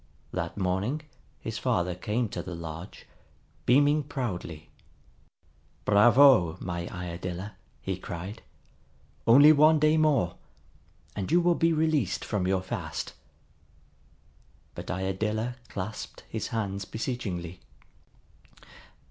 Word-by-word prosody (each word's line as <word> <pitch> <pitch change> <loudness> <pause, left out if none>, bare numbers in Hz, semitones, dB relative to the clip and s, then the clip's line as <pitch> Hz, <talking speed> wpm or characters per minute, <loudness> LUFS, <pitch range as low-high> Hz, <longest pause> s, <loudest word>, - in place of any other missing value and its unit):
That 85 +3 -3
morning 100 +11 -1 0.4
his - - -4
father 90 0 0
came 105 +6 -1
to - - -4
the 90 - -7
lodge, 85 +3 -8 0.6
beaming 145 +4 +5
proudly. 110 - -5 1.1
"Bravo, 105 - +6
my 85 -1 -4
Iadilla!" 90 +2 -5 0.3
he - - -2
cried. 95 +6 -7 0.9
"Only 140 +6 +9
one 155 +1 +6
day 155 +1 +4
more, 140 - +2 0.8
and 100 +4 -3
you 175 - +5
will 175 0 +3
be 165 0 +2
released 155 - +1
from 95 -3 -1
your 95 0 +1
fast." - - -4 1.6
But - - -8
Iadilla 105 +6 -2
clasped 105 +2 -6
his - - -4
hands 100 -3 -3
beseechingly. 95 -8 -4
105 Hz, 105 wpm, -28 LUFS, 90-140 Hz, 1.6 s, Only